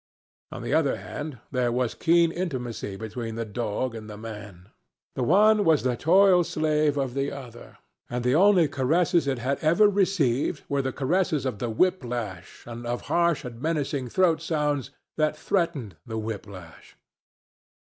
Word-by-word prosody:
On - - -7
the - - -2
other - - +2
hand, 150 -3 -7
there 125 -3 +1
was 125 -1 0
keen 170 0 +3
intimacy 125 - -4
between 110 +2 -6
the 115 0 -3
dog 115 +3 -3
and 110 -1 -8
the 105 - -8
man. 105 -4 -10 0.4
The - - -4
one 205 - +4
was 160 -5 +3
the 125 -1 +1
toil 180 - +5
slave 155 -2 0
of 135 -3 -1
the 140 +1 -1
other, 125 -4 -10 0.3
and 120 0 -3
the 125 +1 +2
only 180 0 +5
caresses 155 +4 +1
it 135 -2 0
had 130 +3 -2
ever 170 +7 +4
received 180 -9 +1
were 140 -1 0
the 130 0 -2
caresses 155 +1 0
of 125 -6 -3
the 120 - -2
whip 180 +9 +1
lash 110 -7 -6
and 120 0 -7
of 120 +1 -2
harsh 170 -4 +2
and 120 -1 -8
menacing 145 -4 -1
throat 165 +3 +2
sounds 150 -5 -1 0.3
that 155 -1 +1
threatened 160 - -1
the 110 -1 -4
whip 110 -1 -5
lash. 90 -5 -13
135 Hz, 170 wpm, -26 LUFS, 120-165 Hz, 0.4 s, toil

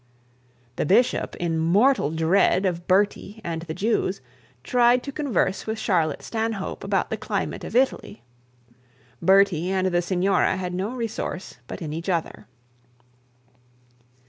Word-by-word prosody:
The - - 0
bishop, 240 +8 +2
in 165 -2 -1
mortal 200 - +3
dread 165 +4 +2
of 175 -2 -2
Bertie 200 +2 +1
and 165 -1 -3
the 165 -1 -6
Jews, 205 -3 0 0.4
tried 245 - +3
to 280 - -5
converse 250 - -1
with 220 0 -2
Charlotte 170 -8 0
Stanhope 220 -3 -3
about - - -1
the - - -1
climate - - -3
of - - -7
Italy. 255 - 0 1.0
Bertie 190 -2 +4
and 190 -1 0
the 175 -1 +1
signora 185 +1 +1
had 180 -1 -4
not 200 +8 -3
resource 220 - -5
but - - -7
in 150 -1 -5
each 165 +4 -5
other. 165 - -2
190 Hz, 135 wpm, -24 LUFS, 170-220 Hz, 1.0 s, Bertie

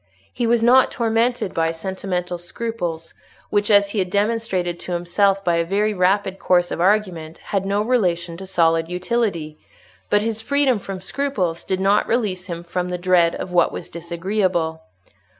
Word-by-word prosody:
He 240 - -1
was 235 0 +2
not 255 +2 +6
tormented 230 -2 0
by 165 0 +1
sentimental 180 +1 -4
scruples 175 -4 -4 0.4
which, 205 0 +1
as 200 -1 +5
he 210 - -1
had 185 -1 0
demonstrated 200 -4 -1
to 180 - -5
himself 195 +3 +1
by 170 -1 +2
a 170 - +2
very 205 +5 0
rapid 190 +1 +1
course 175 -1 +2
of - - -2
argument, 180 -5 0
had 195 -1 -3
no 200 +1 +1
relation 180 -8 0
to 190 +1 -8
solid 165 -3 +2
utility; 180 -5 -2 0.5
but 205 0 +3
his 225 -1 -2
freedom 270 -1 +2
from 195 -1 -7
scruples 190 -7 -2
did 190 - -2
not 200 +2 +2
release 200 -6 -1
him 170 -2 -5
from 180 +1 -3
the 180 - -2
dread 175 -1 +3
of 180 - -6
what 175 -1 +4
was - - -7
disagreeable. 170 -1 -1
185 Hz, 170 wpm, -21 LUFS, 175-210 Hz, 0.5 s, not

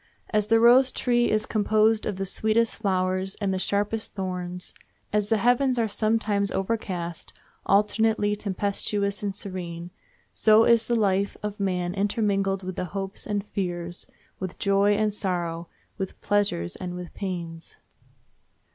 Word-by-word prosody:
As 210 -2 +2
the 225 +1 +4
rose 250 +3 +6
tree 240 -1 +1
is 215 0 +1
composed 215 +1 +2
of 210 - -2
the 195 +1 -3
sweetest 220 +4 +1
flowers 185 0 0
and 200 -3 0
the 190 - -1
sharpest 205 +3 -1
thorns; 180 -2 -4 0.4
as 210 -1 +1
the 225 - +3
heavens 250 +3 +3
are 230 -1 +2
sometimes 215 -1 +1
overcast, 185 -5 -3 0.3
alternately 210 +1 +2
tempestuous 200 0 -1
and 200 -2 -3
serene, 175 -3 -6 0.4
so 220 0 +5
is 230 -1 +4
the 240 - +1
life 200 -2 +1
of 210 0 -4
man 180 -2 -1
intermingled 195 -1 0
with 185 0 -5
hopes 195 +2 -5
and 205 -1 -2
fears, 175 -3 -2 0.3
with 185 -2 -5
joy 200 +1 +3
and 215 0 +1
sorrow, 175 -4 -2 0.3
with 190 -1 -5
pleasures, 205 - 0
and 180 -1 -6
with 180 -1 -8
pains. 170 -4 -6
200 Hz, 140 wpm, -26 LUFS, 185-215 Hz, 0.4 s, rose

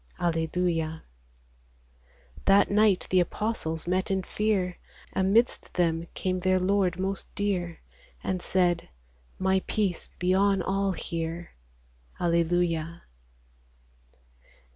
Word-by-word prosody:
Alleluia! 165 -1 0 1.4
That 200 +1 +5
night 210 -2 +4
the 185 - +5
apostles 175 -3 -2
met 185 +2 0
in 190 -1 0
fear; 195 -3 -1 0.3
Amidst 200 +6 +2
them 170 -1 +1
came 185 -1 -1
their 185 +1 +2
Lord 185 -1 +2
most 195 +1 -2
dear, 180 -5 -2 0.4
And 185 -1 -1
said, 175 -3 +1 0.2
" - - -34
My 190 0 +3
peace 200 -5 -1
be 180 +1 +1
on 195 -1 +3
all 195 +1 0
here." 165 0 -4 0.7
Alleluia 170 -1 +1
180 Hz, 100 wpm, -27 LUFS, 170-195 Hz, 1.4 s, That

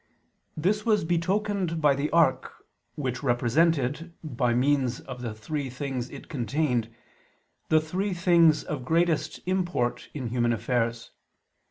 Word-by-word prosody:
This 200 +7 +1
was 215 -7 +2
betokened 185 +1 0
by 150 -2 +4
the 140 +2 -1
ark, 165 -5 +1 0.3
which 130 -4 -3
represented, 140 +5 +1
by 125 -5 0
means 130 -1 +1
of 125 - -8
the 115 -3 -4
three 135 +6 -4
things 125 -1 -4
it - - -10
contained, 125 -3 -1 0.8
the 155 - +5
three 185 +5 -2
things 170 -3 +4
of 140 -4 -4
greatest 160 +1 +1
import 180 -9 -1
in 130 -5 -3
human 120 0 +1
affairs. 115 0 -1
150 Hz, 130 wpm, -27 LUFS, 125-170 Hz, 0.8 s, the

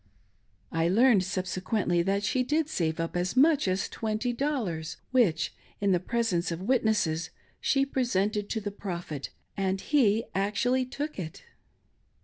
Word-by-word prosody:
I 165 0 +1
learned 220 0 +5
subsequently 185 0 0
that 195 +3 0
she 255 +5 +1
did 300 +4 +1
save 160 - -1
up 165 +1 -2
as 180 +6 -1
much 295 -2 +5
as 185 +1 0
;^20, 225 - -2
which, 240 -11 +2 0.3
in 200 -1 +2
the 180 - +3
preSenc'e 185 -4 0
of 170 +2 -4
witnesses, 210 -9 +1 0.3
she 275 0 +2
presented 210 -6 0
to 225 - -1
the 205 -1 -4
Prophet 175 -8 -5 0.2
— - - -48
and 195 -1 0
he 225 -3 +3
actually 210 +7 +1
took 290 +1 -5
it! 160 -3 -6
200 Hz, 140 wpm, -28 LUFS, 180-245 Hz, 0.3 s, learned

